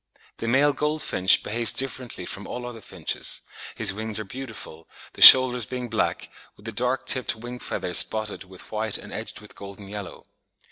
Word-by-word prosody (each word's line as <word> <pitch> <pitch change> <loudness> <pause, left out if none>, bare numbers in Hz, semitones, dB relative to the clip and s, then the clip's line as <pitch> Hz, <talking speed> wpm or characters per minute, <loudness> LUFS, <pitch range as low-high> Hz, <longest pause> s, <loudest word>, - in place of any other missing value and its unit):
The 115 - -6
male 140 +5 +2
goldfinch 150 -11 +1
behaves 115 +1 -1
differently 130 -7 -4
from 100 +2 -7
all 125 0 -7
other 120 -2 -9
finches: 90 -5 -5 0.3
his - - +3
wings 110 +1 -5
are 110 - -5
beautiful, 110 -8 -10 0.2
the - - -12
shoulders 125 -3 +10
being 125 -1 -6
black, 110 - -3 0.2
with 105 - -21
the 115 - -6
dark 125 +4 -2
tipped 130 -3 -1
wing 120 +2 -10
feathers 90 -6 -1
spotted 110 -1 0
with 95 -1 -15
white 110 -1 -2
and - - -12
edged - - -8
with - - -16
golden 100 0 -12
yellow. 100 -1 -10
115 Hz, 175 wpm, -23 LUFS, 100-125 Hz, 0.3 s, shoulders